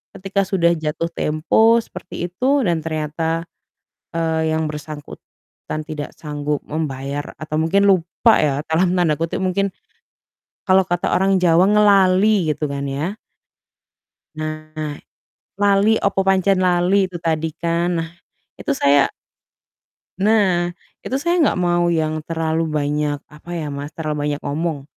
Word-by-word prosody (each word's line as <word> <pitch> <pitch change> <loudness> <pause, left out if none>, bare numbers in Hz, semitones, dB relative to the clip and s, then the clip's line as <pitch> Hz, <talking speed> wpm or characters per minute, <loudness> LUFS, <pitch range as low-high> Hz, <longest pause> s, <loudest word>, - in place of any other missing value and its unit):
ketika 195 +1 -1
sudah 170 -3 +2
jatuh 160 +1 -3
tempo 220 +10 +3
seperti 175 -1 -7
itu 265 +8 +1
dan 170 -2 +1
ternyata, 160 +1 -2 0.7
eee, 160 -1 0
yang 160 -1 -1
bersangkutan 150 +1 -9
tidak 150 -1 -6
sanggup 150 -1 -3
membayar 145 -2 -4
atau 155 0 -4
mungkin 195 +5 +2
"lupa" 185 +5 +3
ya, 145 -3 +2
dalam 175 +3 +2
tanda 165 -5 +2
kutip 165 +3 -2
mungkin, 195 +1 0 0.9
kalau 190 -1 +4
kata 175 0 -1
orang 190 0 +2
Jawa 170 +2 +5
"ngelali" 200 -3 +4
gitu 150 - -3
kan 140 0 -3
ya. 155 +10 -3 1.2
Nah, 155 -1 -5 0.6
lali, 205 +2 +3
opo 195 -1 +2
pancen 190 0 +2
lali, 180 +1 +2
itu 175 - -6
tadi 160 0 +1
kan. 170 +1 0
Nah, 165 0 -2 0.5
itu 285 - -2
saya 140 - +4 1.2
Nah, 190 -4 +3 0.3
itu 260 - -4
saya 345 +5 +1
nggak 280 - +2
mau 175 -1 +2
yang 155 -2 0
terlalu 165 0 -1
banyak 150 -1 -1
apa 150 +3 -15
ya, 150 -3 -4
Mas, 140 +1 -7
terlalu 150 -2 -2
banyak 145 0 -2
ngomong. 150 0 -2
165 Hz, 130 wpm, -20 LUFS, 155-190 Hz, 1.2 s, Jawa